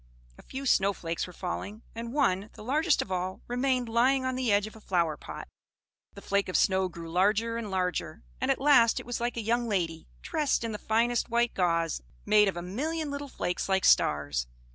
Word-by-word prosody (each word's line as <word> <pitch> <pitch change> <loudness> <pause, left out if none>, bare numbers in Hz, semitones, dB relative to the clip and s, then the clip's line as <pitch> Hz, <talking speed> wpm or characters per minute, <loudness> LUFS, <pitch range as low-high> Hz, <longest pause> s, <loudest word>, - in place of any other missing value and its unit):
A - - -15
few 270 +1 -7
snow 200 -6 +3
flakes 165 -1 -4
were - - -10
falling, 200 +5 -5
and 230 +1 -6
one, 210 -8 +1
the - - -11
largest 300 +7 +2
of - - -12
all, 185 +1 -2
remained 250 0 0
lying 255 +4 +2
on 260 - 0
the 255 -3 0
edge 205 0 +3
of 215 - -10
a 220 - -13
flower 170 -6 0
pot. - - -9 0.7
The - - -11
flake 200 -1 0
of 185 - +2
snow 190 -1 +2
grew 170 -1 -9
larger 210 +6 +2
and 230 -3 -4
larger; 180 - -2 0.2
and - - 0
at - - +2
last 265 -5 +5
it - - -9
was 240 0 -4
like 240 0 -2
a - - -1
young 235 +2 0
lady, 165 -5 -2 0.2
dressed 300 -7 0
in 230 - -2
the 210 - -5
finest 235 +2 +1
white 235 0 +1
gauze, 165 -3 0 0.2
made 210 -1 +5
of 185 -3 -1
a 175 - -4
million 295 - -3
little 285 0 -5
flakes 180 -5 -3
like 190 0 +2
stars. 70 -5 +3
215 Hz, 210 wpm, -29 LUFS, 185-245 Hz, 0.7 s, last